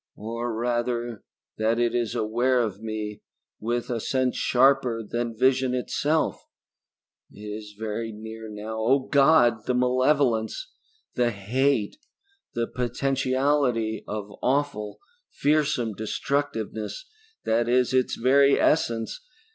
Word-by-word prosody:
Or 115 +2 -4
rather 120 -1 -2 0.4
that 110 +1 +2
it 120 -1 +1
is 120 -3 -1
aware 120 +4 +1
of 105 -4 -2
me 110 -1 -5 0.4
with 120 +2 -2
a 120 - -1
sense 130 +2 0
sharper 125 -3 +3
than 120 +1 -3
vision 130 +1 +2
itself. 150 +5 0 0.9
It 105 - -14
is 105 0 -7
very 110 +1 -3
near 110 +1 -8
now. 105 +1 -6
Oh 125 +5 +3
God, 135 -6 +4
the 125 - +1
malevolence, 130 - +1 0.4
the 120 -1 +2
hate 115 - 0 0.6
the 115 0 +1
potentiality 130 -1 0
of 105 -1 -5
awful, 130 -6 -1 0.3
fearsome 145 -6 +1
destructiveness 110 - -3 0.4
that 115 +1 +1
is 125 +1 +2
its 130 -1 +2
very 140 +3 +4
essence! 115 - +1
120 Hz, 115 wpm, -25 LUFS, 110-130 Hz, 0.9 s, God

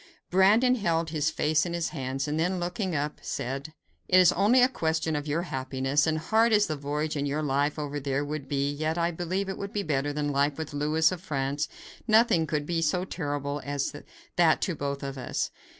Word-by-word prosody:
Brandon 210 +7 +5
held 170 -8 0
his 155 -1 +1
face 155 0 +1
in 175 - -3
his 170 -1 -1
hands, 135 -2 -3
and 150 +1 -1
then 180 +3 0
looking 180 +1 -2
up 150 +1 -2
said: 135 +4 -4 0.4
"It 185 - +6
is 180 -3 +7
only 225 +7 +4
a - - +7
question 160 -8 -1
of 145 0 -3
your 155 +4 0
happiness, 135 -1 0
and 155 0 +1
hard 220 +8 +2
as 210 -1 +5
the 155 - -2
voyage 150 +2 -2
and 145 0 -1
your 150 +2 -1
life 145 +1 0
over 145 -1 -3
there 140 +1 -1
would 145 -1 -5
be, 140 0 0
yet 155 +3 -2
I 170 0 +1
believe 180 +3 -2
it 190 - -5
would 200 0 -5
be 205 - -1
better 145 -2 0
than 145 0 -1
life 140 +1 +1
with 160 -2 -5
Louis 150 +3 +2
of 180 -2 -5
France; 140 -2 -2 0.4
nothing 220 -7 +4
could 150 -2 -1
be 165 +1 -1
so 175 +4 +1
terrible 145 -4 -3
as 145 -1 -2 0.4
that - - +5
to - - 0
both 140 -1 -4
of 135 -1 -5
us. 125 - -2
155 Hz, 215 wpm, -27 LUFS, 145-175 Hz, 0.4 s, is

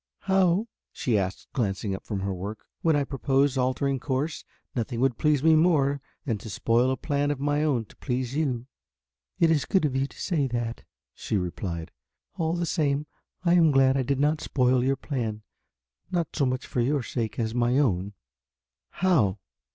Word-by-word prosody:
"How?" 190 +1 +3 0.3
she 120 - -1
asked, 95 -2 -2
glancing 100 -4 -1
up 95 - -6
from 100 -3 -2
her 100 0 -1
work. 100 +4 -6 0.2
"When 160 -2 +3
I 145 - +2
proposed 135 0 +1
altering 130 +1 +1
the - - -22
course. 145 +3 -2 0.3
Nothing 115 -1 -2
would 130 -2 +1
please 150 -2 +2
me 160 0 +6
more 145 -4 +3 0.2
than 115 -7 -1
to 110 - -8
spoil 115 +5 +2
a 130 - 0
plan 145 +2 0
of 145 -2 -1
my 145 +1 +1
own 130 -7 +1
to - - -19
please 125 0 -2
you." 130 -6 -1 0.7
"It 165 -2 +5
is 150 -4 +2
good 190 -5 +2
of 135 -3 -1
you 135 +1 +1
to - - -16
say 155 -7 0
that," 120 -2 -3 0.3
she 105 - -2
replied, 85 -2 -4 0.4
"all 165 0 0
the 175 0 -1
same 150 -3 0 0.4
I 170 - +5
am 170 -3 +6
glad 135 -2 +4
I 135 - +2
did 135 +1 0
not 150 +2 +2
spoil 125 -1 +2
your 135 +1 +2
plan, 115 -7 -4 0.7
not 170 -3 -2
so 140 -4 +2
much 130 0 -2
for 125 - -1
your 135 +2 +1
sake 115 -2 -3
as 110 -1 -1
my 120 +1 +2
own." 100 -8 +1 0.9
"How?" 120 - +3
135 Hz, 190 wpm, -26 LUFS, 115-150 Hz, 0.9 s, me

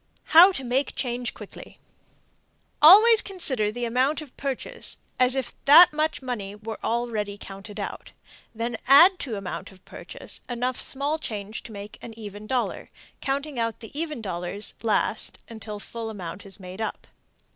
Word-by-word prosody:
HOW 350 +4 +10
TO 270 -8 -5
MAKE 255 +3 -1
CHANGE 245 -1 -3
QUICKLY. - - -11 1.0
Always 430 +8 +9
consider 260 - 0
the 240 +2 -4
amount 255 +6 +1
of 300 -5 -11
purchase 280 - -2 0.2
as 255 +1 +5
if 265 -2 -2
that 310 +4 +9
much 310 -2 -1
money 210 -6 -5
were 220 +1 -7
already 220 -3 -2
counted 200 +1 -10
out, 200 - -6 0.4
then 230 +1 -3
add 340 +8 +8
to 240 -6 -4
amount 195 -1 -6
of 190 0 -20
purchase - - -7
enough 245 +1 -2
small 285 +3 0
change 215 -5 -5
to - - -11
make 205 0 -9
an 225 -1 -10
even 210 -1 -9
dollar, 255 0 -2 0.3
counting 275 0 -3
out 230 -1 -2
the 225 - -10
even 305 -6 -4
dollars 185 +2 -4
last 225 -2 0
until 220 -2 -7
full 230 +2 -7
amount 190 -2 -8
is 195 - -7
made 185 +2 -9
up. 220 - -4
235 Hz, 155 wpm, -25 LUFS, 210-280 Hz, 1.0 s, HOW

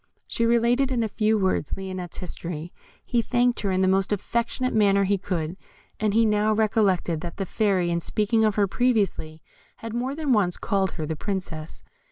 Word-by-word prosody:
She 230 - 0
related 240 +3 +2
in 240 -3 +1
a - - 0
few 215 +1 +1
words 190 -7 0
Lionette's 185 -2 -6
history. 170 -2 -6 0.3
He 240 -2 +1
thanked 245 +1 +1
her 200 - -1
in 185 0 +1
the 190 - +3
most 190 +1 +2
affectionate 235 +5 -1
manner 200 -2 +4
he 195 0 +1
could, 175 -2 -3 0.4
and 215 -1 0
he 230 0 +5
now 210 0 +2
recollected 200 -6 +1
that 170 - -7
the 195 - -2
Fairy, 190 -4 +1
in 170 - +1
speaking 215 +5 +1
of 215 -2 +2
her 205 - +3
previously, 195 -9 0 0.3
had 225 -1 -8
more 250 +4 -2
than 300 -4 +1
once 190 -5 +2
called 195 -3 0
her 155 - -4
the 160 +1 -3
Princess. 165 -4 -5
205 Hz, 190 wpm, -25 LUFS, 185-225 Hz, 0.4 s, he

